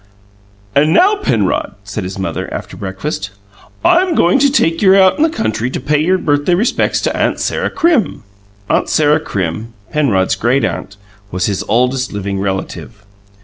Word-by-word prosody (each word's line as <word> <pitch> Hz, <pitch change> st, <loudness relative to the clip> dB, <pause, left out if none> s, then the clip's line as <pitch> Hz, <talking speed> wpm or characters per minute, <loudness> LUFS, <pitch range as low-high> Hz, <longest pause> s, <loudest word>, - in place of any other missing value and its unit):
"And 150 Hz, +3 st, +3 dB
now, 405 Hz, -, +4 dB
Penrod," 110 Hz, -, -1 dB
said 100 Hz, 0 st, -5 dB
his 95 Hz, +1 st, -6 dB
mother, 95 Hz, -, -4 dB
after -, -, -6 dB
breakfast, 95 Hz, +3 st, -5 dB, 0.6 s
"I'm 355 Hz, 0 st, +3 dB
going 175 Hz, +10 st, +3 dB
to 280 Hz, +1 st, +4 dB
take 165 Hz, -, +1 dB
you 190 Hz, -2 st, +6 dB
out 190 Hz, -1 st, +4 dB
in -, -, -2 dB
the 320 Hz, -, +4 dB
country 115 Hz, -, -2 dB
to -, -, -4 dB
pay 150 Hz, +3 st, 0 dB
your 185 Hz, +4 st, +2 dB
birthday 145 Hz, +1 st, +1 dB
respects 220 Hz, +7 st, +1 dB
to -, -, -1 dB
Aunt -, -, 0 dB
Sarah -, -, -1 dB
Crim." 320 Hz, -, +1 dB, 0.4 s
Aunt -, -, 0 dB
Sarah 150 Hz, 0 st, +3 dB
Crim, 100 Hz, -, -4 dB, 0.2 s
Penrod's 110 Hz, -12 st, +1 dB
great 130 Hz, +4 st, +1 dB
aunt, 100 Hz, -, -5 dB, 0.3 s
was 90 Hz, -2 st, -2 dB
his 100 Hz, -1 st, -2 dB
oldest 125 Hz, +3 st, +1 dB
living 100 Hz, -1 st, -3 dB
relative. 100 Hz, +2 st, -5 dB
130 Hz, 165 wpm, -15 LUFS, -, 0.6 s, you